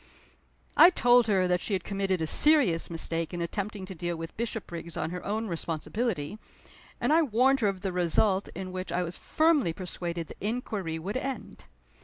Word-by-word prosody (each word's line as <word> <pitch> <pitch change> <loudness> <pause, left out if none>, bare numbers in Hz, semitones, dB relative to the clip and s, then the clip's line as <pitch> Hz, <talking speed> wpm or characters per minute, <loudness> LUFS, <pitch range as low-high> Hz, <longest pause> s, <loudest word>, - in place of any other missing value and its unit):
I 345 - +9
told 245 -8 +4
her 190 -3 +2
that 180 0 +1
she 210 - -3
had 185 -3 -1
committed 195 -3 -1
a - - +1
serious 250 - +5
mistake 165 0 -2
in 175 - -4
attempting 200 +3 -4
to 190 - -8
deal 175 0 -3
with 165 0 -7
Bishopriggs 175 -8 -5
on 160 - -2
her 180 0 -6
own 220 +2 -2
responsibility; 170 +2 -3 0.6
and - - +1
I 330 - +5
warned 265 0 +3
her 215 - +2
of 195 -2 -2
the 190 -2 -3
result 190 +3 +2
in 190 -1 -6
which 185 0 -5
I 180 - 0
was 175 0 -6
firmly 310 - +2
persuaded 175 -2 -5
the - - -12
inquiry 205 -7 -3
would 195 +8 -4
end. 270 0 -6
190 Hz, 185 wpm, -28 LUFS, 170-225 Hz, 0.6 s, I